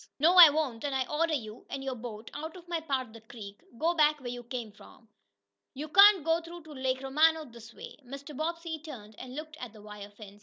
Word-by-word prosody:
"No, 320 +5 +4
I 350 -4 +11
won't, 285 -6 -2
and 285 -2 -2
I 260 -1 0
order 315 +1 0
you, 220 -4 -7
and 270 - -5
your 265 -1 -3
boat, 225 -2 -8
out 315 +3 -6
of 350 -1 -13
my 340 -1 -1
part 275 -5 -2
of 220 - -18
the 230 - -12
creek. 210 -3 -11 0.2
Go 330 +5 +1
back 300 -2 +3
where 245 -3 -6
you 245 0 -6
come 240 -2 -6
from. 225 +3 -18 0.7
You 300 +3 -6
can't 395 0 +7
go 330 +1 +2
through 340 0 -11
to 315 - -13
Lake 260 -1 -2
Romano 310 +4 +3
this 235 -3 -13
way!" - - -11
Mr. 275 +3 -9
Bobbsey 330 +1 -3
turned 240 -9 -10
and 255 0 -9
looked 310 +1 -8
at 245 -7 -8
the 215 - -14
wire 210 -1 -10
fence. 205 -1 -14
275 Hz, 235 wpm, -29 LUFS, 235-315 Hz, 0.7 s, I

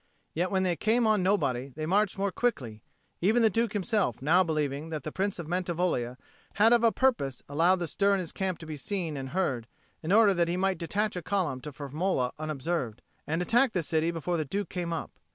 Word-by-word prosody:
Yet 175 +3 0
when 190 -1 +1
they 180 -2 +1
came 225 +6 +2
on 215 -3 +3
nobody, 140 -9 0
they 155 0 -3
marched 200 +4 +1
more 200 0 0
quickly, 130 - -2 0.4
even 220 +6 +3
the 220 - +5
Duke 230 +1 0
himself 205 - 0
now 165 +7 +4
believing 150 -2 -2
that 155 -3 -4
the 155 - -5
Prince 195 +3 -1
of 170 - -5
Mantivoglia 175 -8 -1 0.4
had 220 +3 +5
of 235 -1 +4
a 230 - +5
purpose 220 - 0
allowed 165 +6 +3
the 175 -2 -3
stir 200 +5 +2
in - - -1
his 175 -4 -4
camp 190 -3 -2
to 165 - -10
be 155 -1 -6
seen 165 +1 -3
and 135 -1 -5
heard, 130 -9 -1 0.3
in 160 - -3
order 210 -1 +6
that 170 -2 +1
he 175 +1 -1
might 190 -2 0
detach 205 +5 -1
a 180 - -3
column 180 -9 -1
to 150 - -7
Firmola 145 -1 -1
unobserved, 155 -5 -3 0.2
and 160 +3 0
attack 240 +5 +3
the 180 - 0
city 160 +1 0
before 170 +1 -2
the 155 - 0
Duke 200 +8 -3
came 175 -2 -3
up. 165 - -4
175 Hz, 220 wpm, -28 LUFS, 150-200 Hz, 0.4 s, order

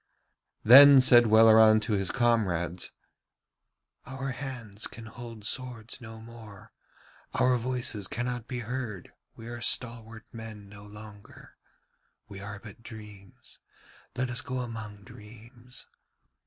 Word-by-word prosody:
Then 140 +4 +9
said 120 -2 +6
Welleran 110 0 +6
to 110 0 -2
his 95 -2 -1
comrades: 95 -8 -1 1.2
'Our 135 +1 -6
hands 120 -5 -6
can 110 +2 -12
hold 115 -1 -11
swords 125 -2 -5
no 110 -1 -11
more, 110 -3 -14 0.6
our 125 0 +2
voices 120 -4 -1
cannot 120 -1 -4
be 125 -2 -5
heard, 115 -5 -6 0.2
we 115 - -12
are 120 0 -8
stalwart 115 -2 -3
men 110 -3 -10
no 105 0 -14
longer. 105 -1 -14 0.7
We 100 -2 -10
are 100 +1 -8
but 105 +1 -14
dreams, 105 -4 -14 0.6
let 130 -1 -2
us 125 - 0
go 130 -1 -4
among 110 -4 -8
dreams. 115 +3 -14
115 Hz, 120 wpm, -27 LUFS, 105-125 Hz, 1.2 s, Then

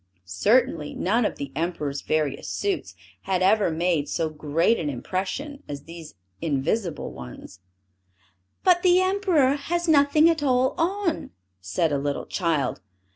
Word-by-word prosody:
Certainly, 150 - +1
none 220 +5 +1
of - - -1
the 140 -1 -6
Emperor's 155 -3 -2
various 155 -3 -1
suits, 400 -3 -2 0.3
had 185 -1 +2
ever 200 0 +4
made 165 -2 0
so 165 -2 -1
great 155 +8 +1
an 150 - -2
impression, 195 - -4
as 140 -1 -6
these 165 -5 -11 0.3
invisible 165 +4 -1
ones. 65 +8 -10 1.0
"But 360 -2 +5
the 360 0 +5
Emperor 370 -8 +2
has 345 +4 -2
nothing 300 +1 +5
at 330 -2 +2
all 260 -2 +2
on!" 355 0 -1 0.3
said 95 - 0
a 140 - +1
little 140 0 -2
child. 160 -8 -1
180 Hz, 135 wpm, -25 LUFS, -, 1.0 s, But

